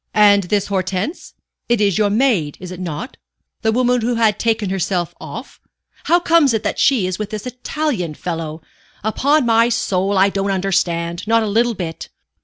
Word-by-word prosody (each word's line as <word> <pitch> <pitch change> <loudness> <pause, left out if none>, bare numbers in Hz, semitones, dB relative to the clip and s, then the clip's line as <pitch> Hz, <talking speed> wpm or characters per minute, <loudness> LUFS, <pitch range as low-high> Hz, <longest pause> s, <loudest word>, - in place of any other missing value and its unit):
"And 205 -2 +5
this 200 +2 0
Hortense? 190 - -3 0.3
It 240 -2 +3
is 200 -2 +2
your 210 -1 +3
maid, 205 - +1
is 180 0 -8
it 180 - -8
not 175 - -5 0.4
the 220 - +2
woman 245 +1 +2
who 240 +2 0
had 220 -3 +2
taken 220 -4 0
herself 185 -2 -1
off? - - -9 0.5
How 345 +2 +4
comes 330 -7 +3
it 220 - -2
that - - -2
she 260 -8 +3
is 185 +1 -3
with 210 - -3
that 215 +1 -6
Italian 250 - -3
fellow? 165 -2 -5 0.4
Upon 280 +7 +2
my 230 0 +4
soul, 195 -4 0
I 195 +1 +5
don't 195 0 -2
understand 175 -2 -1
not 230 0 +3
a - - -2
little 230 +3 +1
bit." 165 -4 -6
205 Hz, 180 wpm, -19 LUFS, 185-235 Hz, 0.5 s, And